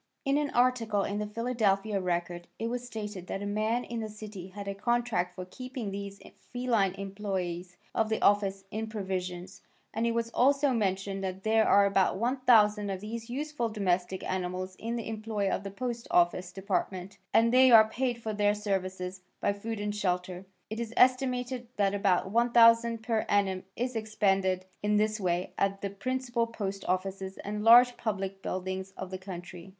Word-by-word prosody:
In 275 +1 +2
an 295 -1 -1
article 235 -5 +2
in 200 +1 -2
the 210 - -2
Philadelphia 215 -3 0
Record 175 -1 -2
it 230 +1 -3
was 245 0 -3
stated 210 -5 -6
that 195 - -4
a - - -3
man 215 +4 0
in 235 -1 -5
that 220 -1 -4
city 210 -3 -8
had 200 +1 -8
a 200 - -2
contract 215 -4 0
for 185 - -6
keeping 255 +1 -6
these 200 0 -6 0.3
feline 230 -7 +1
employes 190 -3 -4 0.2
of 220 -1 +1
the 220 - 0
office 195 -1 +2
in 220 +1 -3
provisions, 190 -2 -4 0.3
and 225 +1 0
it 230 - +1
was 230 0 -1
also 275 +3 +3
mentioned 195 -3 -1
that 190 0 -4
there 220 0 +3
are 200 0 +6
about 195 -1 +2
1,000 225 -4 +3
of 190 -1 -3
these 225 +2 -6
useful 285 -2 -2
domestic 190 -3 -1
animals 185 0 -3
in 230 +1 -3
the 230 - -4
employ 215 -2 -2
of - - -1
the 200 - -5
Post 235 +3 -4
Office 175 +1 +2
Department 190 0 -3
and 230 +1 +4
they 260 0 +7
are 220 -2 +8
paid 245 +1 -2
for 220 - -2
their 205 0 +2
services 190 -2 -3 0.2
by 200 - +1
food 220 +2 -5
and 205 0 -2
shelter. 180 -1 -2 0.2
It 220 - -3
is 235 0 -5
estimated 250 -1 +2
that 200 -1 +2
about 195 -1 +1
$1,000 230 -1 +5
per 225 -2 0
annum 190 -2 +1
is 250 +1 -2
expended 195 -4 +1 0.2
in 210 0 +2
this 215 +1 +1
way 180 -1 -1
at 195 0 0
the 200 - -3
principal 240 +2 -1
post 200 -4 -4
offices 190 +1 -2
and 210 +1 -4
large 245 +2 +7
public 195 -3 -3
buildings 190 +1 -4
of 190 0 -6
the 185 - -5
country. 180 -1 -9
205 Hz, 175 wpm, -29 LUFS, 190-230 Hz, 0.3 s, are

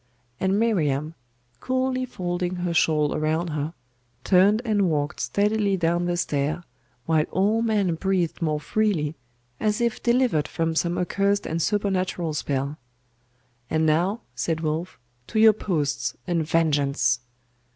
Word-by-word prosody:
And 190 +1 +1
Miriam, 155 -9 +1 0.5
coolly 255 - 0
folding 180 -5 -3
her 175 -1 -2
shawl 155 -2 +2
around 160 +3 0
her, 150 +2 -3 0.5
turned 195 +3 +4
and 205 -5 +2
walked 150 -1 -1
steadily 205 -1 +1
down 170 0 +1
the 175 0 0
stair; 150 +1 -1 0.4
while 160 -1 +2
all 205 +5 +2
men 210 -6 +1
breathed 175 -1 -1
more 155 -2 0
freely, 165 -4 0 0.5
as 210 -1 0
if 235 -1 0
delivered 240 - +2
from 165 0 -1
some 170 +2 0
accursed 200 +2 0
and 165 +1 -2
supernatural 185 -4 0
spell. 140 0 -2 0.9
'And 160 0 +1
now,' 175 +8 +1
said 160 +6 -2
Wulf, 160 +3 -3 0.3
'to 220 - -1
your 220 0 +8
posts, 145 - -2
and 170 -2 0
vengeance! 145 -7 +2
175 Hz, 130 wpm, -24 LUFS, 155-200 Hz, 0.9 s, your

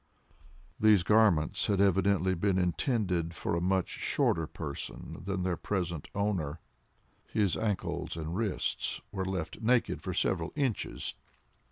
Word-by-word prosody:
These 105 -4 +6
garments 105 -7 +3
had 100 -2 +1
evidently 95 -1 +3
been 95 +2 +1
intended 90 - 0
for - - -1
a 85 - 0
much 95 0 +1
shorter 80 -1 0
person 75 -4 -6
than 95 -1 -1
their 90 -1 0
present 85 -6 -3
owner. 90 -7 -1 0.7
His 100 -5 +1
ankles 105 -5 -2
and 80 +1 -4
wrists 105 -2 -1
were 95 -2 -2
left 95 0 -4
naked 120 +2 +2
for 95 -2 -4
several 85 -3 0
inches. 135 -7 -1
95 Hz, 130 wpm, -31 LUFS, 85-105 Hz, 0.7 s, These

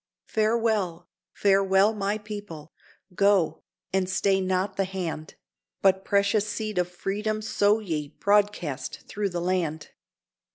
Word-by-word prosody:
Farewell, 215 -6 0 0.2
farewell, 195 +1 +3
my 205 0 -1
people! 205 -8 -8 0.4
go, 190 -5 +3 0.3
and 190 -1 +1
stay 195 +1 +2
not 190 +1 0
the 195 - +1
hand, 175 -5 -5 0.5
But 190 0 +4
precious 200 +1 +2
seed 215 -2 -2
of 180 0 0
Freedom 210 +4 -2
sow 205 -1 +3
ye 160 -9 -3
broadcast 200 -6 0
through 205 -1 -2
the 175 -1 -3
land. 170 -4 -1
195 Hz, 120 wpm, -26 LUFS, 180-210 Hz, 0.5 s, But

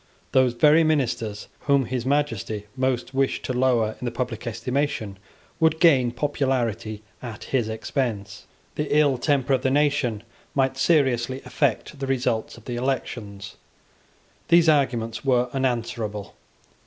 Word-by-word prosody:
Those 130 -2 +4
very 150 +6 +5
ministers 120 -9 -1 0.2
whom 140 -2 +4
His 125 0 -3
Majesty 115 -7 -1
most 130 -1 -1
wished 135 0 0
to 130 - -2
lower 125 -4 +2
in - - -4
the - - 0
public 120 -1 -4
estimation 120 -3 -2 0.4
would 160 -1 +3
gain 140 -8 +5
popularity 120 -5 -1 0.2
at 115 -4 -7
his 120 -5 -1
expense. 110 -3 -3 0.3
The 150 0 0
ill 145 -4 +3
temper 140 -1 +1
of 130 - +2
the 130 - +1
nation 140 -6 +1 0.3
might 135 -1 +2
seriously 130 -4 +2
affect 135 +2 -1
the 135 - -3
result 125 -5 -1
of 115 - -16
the 120 -1 -4
elections. 105 -6 -4 0.9
These 170 0 +5
arguments 120 -7 +1
were 125 -2 +2
unanswerable. 115 -5 -2
125 Hz, 135 wpm, -24 LUFS, 115-140 Hz, 0.9 s, very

